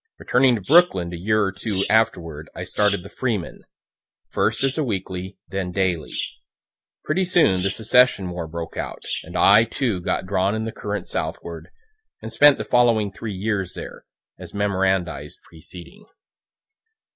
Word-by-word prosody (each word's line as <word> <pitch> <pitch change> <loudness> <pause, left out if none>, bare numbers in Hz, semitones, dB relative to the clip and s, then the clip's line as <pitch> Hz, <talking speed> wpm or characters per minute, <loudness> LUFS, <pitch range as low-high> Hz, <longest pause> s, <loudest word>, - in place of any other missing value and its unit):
Returning 125 0 +3
to 110 - -4
Brooklyn 95 - +3
a - - -3
year 110 +5 +1
or 95 - 0
two 95 0 -2
afterward 85 -9 0
I - - -5
started 105 -3 0
the 100 - -10
"Freeman," 110 -10 -3 0.6
first - - 0
as 135 -1 +1
a 155 - 0
weekly, 95 -4 -4
then 95 0 -3
daily. 90 -4 -1 0.9
Pretty 180 +5 0
soon 165 - +3
the 100 - +1
secession 110 -3 +3
war 85 -2 -5
broke 85 +1 -6
out, - - -5 0.2
and - - -7
I, 105 +3 +7
too, 115 -4 -2
got 85 - -2
drawn 95 +3 0
in 110 0 -2
the 115 - -4
current 105 -4 -4
southward, 85 -1 -5 0.5
and 110 - -8
spent 145 +3 +6
the - - -4
following 115 -4 +3
three 105 0 -6
years 95 -2 -2
there, - - -9 0.3
(as - - -10
memorandized 95 -3 -1
preceding.) 90 - -14
100 Hz, 155 wpm, -22 LUFS, 90-115 Hz, 0.9 s, I